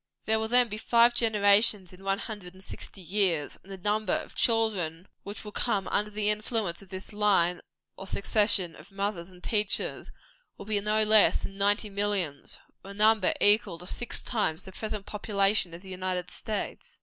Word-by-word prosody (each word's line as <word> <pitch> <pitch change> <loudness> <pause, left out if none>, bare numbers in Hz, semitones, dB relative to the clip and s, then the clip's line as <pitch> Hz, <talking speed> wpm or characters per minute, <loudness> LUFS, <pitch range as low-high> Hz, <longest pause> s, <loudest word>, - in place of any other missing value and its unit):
There 220 0 +2
will 220 - -2
then 245 +1 +4
be 215 -1 -6
five 235 +1 +4
generations 205 -4 +3
in 185 +1 -15
one 195 0 0
hundred 200 -5 -8
and 190 - -13
sixty 195 - -10
years; 175 -4 0
and 195 - -15
the 195 - -7
number 210 +1 0
of - - -3
children 200 -7 +1
which 200 0 -9
will 210 - -7
come 205 -4 -1
under 210 +1 0
the 210 0 -2
influence 210 -4 -2
of 195 - -16
this 190 +3 -8
line 195 -4 +2 0.4
or 195 - -8
succession 200 -3 +1
of 155 - -15
mothers 195 -3 -4
and 180 -1 -18
teachers, 210 -2 0 0.5
will 200 - -10
be 210 -1 0
no 215 +1 +2
less 215 0 +5
than 195 - -6
ninety 205 +1 +1
millions; 195 -8 -2 0.3
or 195 - -11
a - - -8
number 215 -1 +4
equal 205 -4 +4
to 180 - -11
six 240 +5 -3
times 205 -9 -1
the 190 - -9
present 210 0 -5
population 200 -3 0
of 170 +3 -10
the 190 - -12
United 185 -1 -3
States. 215 -3 -5
200 Hz, 185 wpm, -28 LUFS, 185-215 Hz, 0.5 s, less